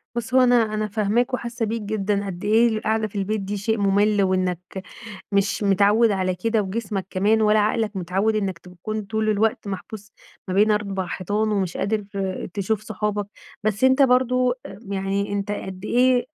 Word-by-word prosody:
بُص 235 Hz, +1 st, -4 dB
هو 260 Hz, -, +6 dB
أنا 245 Hz, -1 st, +5 dB, 0.2 s
أنا 215 Hz, 0 st, -1 dB
فاهماك 220 Hz, +4 st, 0 dB
وحاسة 240 Hz, -1 st, -2 dB
بيك 225 Hz, +1 st, -3 dB
جدًا، 205 Hz, -1 st, -1 dB
قد 180 Hz, -3 st, -6 dB
إيه 225 Hz, +3 st, +4 dB
القعدة 220 Hz, -1 st, 0 dB
في 210 Hz, -, -18 dB
البيت 210 Hz, +2 st, -1 dB
دي 200 Hz, +1 st, -4 dB
شيء 220 Hz, +3 st, 0 dB
ممل 205 Hz, +1 st, +2 dB
وإنك 185 Hz, -2 st, 0 dB, 0.7 s
مش 200 Hz, +1 st, +1 dB
متعود 205 Hz, +3 st, +4 dB
على 185 Hz, -2 st, 0 dB
كده 220 Hz, +4 st, 0 dB
وجسمك 195 Hz, -1 st, -3 dB
كمان 210 Hz, +4 st, +2 dB
ولا 215 Hz, 0 st, +4 dB
عقلك 215 Hz, 0 st, 0 dB
متعود 190 Hz, +4 st, 0 dB
إنك 195 Hz, -4 st, -1 dB
تكون 185 Hz, +5 st, -6 dB
طول 220 Hz, +1 st, -1 dB
الوقت 215 Hz, 0 st, 0 dB
محبوس 205 Hz, +2 st, -7 dB, 0.4 s
ما 185 Hz, -, -2 dB
بين 210 Hz, +3 st, +4 dB
4 200 Hz, -3 st, -1 dB
حيطان 205 Hz, +5 st, -1 dB
ومش 190 Hz, -4 st, -1 dB
قادر 210 Hz, 0 st, -1 dB, 0.5 s
تشوف 205 Hz, +1 st, -1 dB
صحابك، 210 Hz, -1 st, -2 dB, 0.4 s
بس 215 Hz, +2 st, -1 dB
أنت 260 Hz, +2 st, +5 dB
برضو 255 Hz, -1 st, +3 dB, 0.4 s
يعني 200 Hz, +1 st, -2 dB
أنت 205 Hz, +1 st, -2 dB
قد 190 Hz, -2 st, -6 dB
إيه 250 Hz, 0 st, +3 dB
210 Hz, 170 wpm, -23 LUFS, 195-220 Hz, 0.7 s, هو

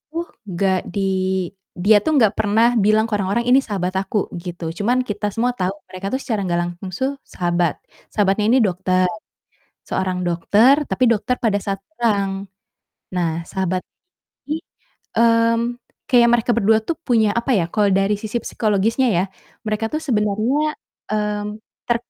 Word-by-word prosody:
tuh 335 Hz, +1 st, -3 dB, 0.3 s
nggak 190 Hz, +1 st, +1 dB, 0.2 s
di 200 Hz, -, -1 dB, 0.7 s
dia 200 Hz, +4 st, +4 dB
tuh 315 Hz, -, +1 dB
nggak 220 Hz, -5 st, +4 dB
pernah 220 Hz, +3 st, +3 dB
bilang 215 Hz, +1 st, +4 dB
ke -, -, -14 dB
orang-orang 200 Hz, +5 st, 0 dB
ini 260 Hz, -, +7 dB
sahabat 185 Hz, -3 st, -2 dB
aku, 195 Hz, +2 st, -2 dB, 0.2 s
gitu. 170 Hz, -2 st, -5 dB
Cuman 245 Hz, +5 st, +2 dB
kita 210 Hz, 0 st, -2 dB
semua 240 Hz, +2 st, +1 dB
tau 185 Hz, +1 st, 0 dB, 0.2 s
mereka 185 Hz, +1 st, -6 dB
tuh 265 Hz, -, -1 dB
secara 220 Hz, -5 st, -2 dB
nggak 175 Hz, -1 st, 0 dB
langsung 175 Hz, +2 st, -6 dB
suh 265 Hz, +1 st, 0 dB
sahabat. 175 Hz, -2 st, 0 dB, 0.4 s
Sahabatnya 205 Hz, 0 st, +2 dB
ini 255 Hz, -, +5 dB
dokter 185 Hz, -2 st, +1 dB, 0.8 s
seorang 185 Hz, -1 st, -1 dB
dokter 205 Hz, +9 st, +4 dB, 0.2 s
tapi 255 Hz, -, +2 dB
dokter 230 Hz, +3 st, 0 dB
pada 215 Hz, -4 st, +2 dB
saat 195 Hz, -1 st, -3 dB
pulang. 200 Hz, -4 st, -1 dB, 0.7 s
Nah 170 Hz, -2 st, -1 dB
sahabat 185 Hz, -1 st, -2 dB, 0.7 s
ini, 310 Hz, +2 st, -1 dB, 0.6 s
mmm, 230 Hz, +1 st, +3 dB, 0.3 s
kayak 240 Hz, -2 st, +6 dB
mereka 240 Hz, 0 st, +2 dB
berdua 220 Hz, 0 st, +4 dB
tuh 325 Hz, +9 st, -3 dB
punya 225 Hz, -4 st, +3 dB
apa 235 Hz, +3 st, -1 dB
ya 170 Hz, -, +1 dB
kalau 210 Hz, -2 st, +2 dB
dari 195 Hz, +2 st, +2 dB
sisi 220 Hz, +3 st, -3 dB
psikologisnya, 220 Hz, +4 st, +1 dB
ya. 180 Hz, -, +2 dB, 0.4 s
Mereka 215 Hz, +1 st, -1 dB
tuh 310 Hz, -, 0 dB
sebenernya, 240 Hz, +5 st, +1 dB, 0.4 s
mmm, 210 Hz, -1 st, -1 dB, 0.4 s
ter 240 Hz, -, +3 dB
210 Hz, 150 wpm, -20 LUFS, 190-235 Hz, 0.8 s, ini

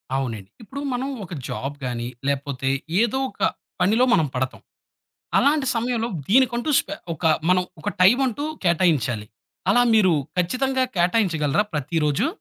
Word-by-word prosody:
అవునండి. 115 Hz, -8 st, -3 dB
ఇప్పుడు 265 Hz, +6 st, -7 dB
మనం 250 Hz, +2 st, -2 dB, 0.2 s
ఒక 180 Hz, -, -9 dB, 0.2 s
జాబ్ 140 Hz, +2 st, -4 dB
గాని 120 Hz, -1 st, -3 dB, 0.2 s
లేపోతే 140 Hz, -1 st, -1 dB, 0.3 s
ఏదో 235 Hz, +3 st, +1 dB
ఒక -, -, -17 dB, 0.4 s
పనిలో 220 Hz, +7 st, +4 dB
మనం 160 Hz, -2 st, +3 dB
పడతాం. 130 Hz, +1 st, -2 dB, 0.8 s
అలాంటి 285 Hz, -1 st, +3 dB
సమయంలో 235 Hz, 0 st, -1 dB, 0.2 s
దీనికంటూ 245 Hz, +4 st, +3 dB
స్పె 300 Hz, -, -2 dB, 0.2 s
ఒక 160 Hz, -, -10 dB, 0.2 s
మనం 180 Hz, 0 st, +4 dB, 0.2 s
ఒక -, -, -4 dB
టైం 205 Hz, +7 st, +6 dB
అంటూ 260 Hz, +4 st, -3 dB, 0.2 s
కేటాయించాలి. 155 Hz, -, +1 dB, 0.4 s
అలా 245 Hz, -, +5 dB
మీరు 195 Hz, -5 st, +5 dB, 0.2 s
ఖచ్చితంగా 260 Hz, +9 st, +1 dB
కేటాయించగలరా 175 Hz, -3 st, +2 dB
ప్రతిరోజు? 150 Hz, -, 0 dB
180 Hz, 130 wpm, -23 LUFS, -, 0.8 s, టైం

